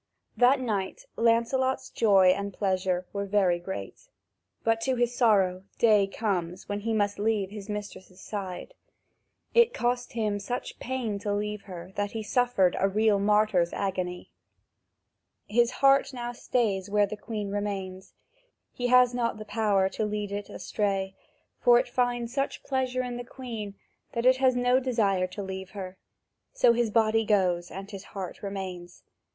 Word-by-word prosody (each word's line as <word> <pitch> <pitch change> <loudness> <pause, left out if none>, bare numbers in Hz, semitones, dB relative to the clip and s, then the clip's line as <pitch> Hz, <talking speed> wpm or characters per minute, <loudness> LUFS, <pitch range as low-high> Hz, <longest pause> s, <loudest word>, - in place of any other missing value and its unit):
That 255 +3 +5
night 205 -7 -3
Lancelot's 235 +3 +1
joy 195 -4 +5
and 200 +2 0
pleasure 185 -2 0
were 200 0 -3
very 190 -4 +2
great. 175 - -7 0.6
But, 225 0 +1
to 260 +2 +1
his 240 0 +1
sorrow, 195 -6 +3
day 210 -4 +4
comes 185 -4 -3
when 205 0 -2
he 225 +2 -3
must 205 -2 0
leave 205 -2 0
his 210 0 -8
mistress' 200 -3 -7
side. 195 - -6 0.8
It 470 0 +5
cost 245 0 -1
him 215 -3 -1
such 245 +5 -5
pain 240 -5 -3
to 205 +1 -3
leave 210 0 -2
her 180 -2 -9
that 205 0 -1
he 220 -1 -3
suffered 225 -6 +2
a 195 - +3
real 210 0 +3
martyr's 210 -4 +2
agony. 185 -2 -3 1.2
His 235 +2 +3
heart 275 +1 +3
now 240 -1 -4
stays 220 -6 -1
where 205 0 +3
the 210 - -6
Queen 210 -2 -5
remains; 195 -2 -4 0.6
he 245 - -2
has 250 0 +5
not 235 -2 -1
the 215 - -8
power 210 -4 +2
to 215 - -3
lead 210 -1 -3
it 205 0 -4 0.3
away, 195 -2 +1 0.5
for 240 -1 +6
it - - +1
finds 245 -1 -1
such 275 0 -2
pleasure 255 -1 -1
in 245 -1 -4
the 245 - -5
Queen 230 -6 -7 0.4
that 235 0 -2
it 255 0 +6
has 260 -1 +3
no 245 +1 +3
desire 210 -8 +1
to 200 +3 -7
leave 190 0 -6
her: 185 -1 -6 0.6
so - - +5
his 235 -1 +1
body 225 0 +3
goes, 180 -5 +1
and 195 +4 -8
his 195 -2 -7
heart 190 -2 -6
remains. 190 -3 -6
210 Hz, 160 wpm, -27 LUFS, 195-240 Hz, 1.2 s, for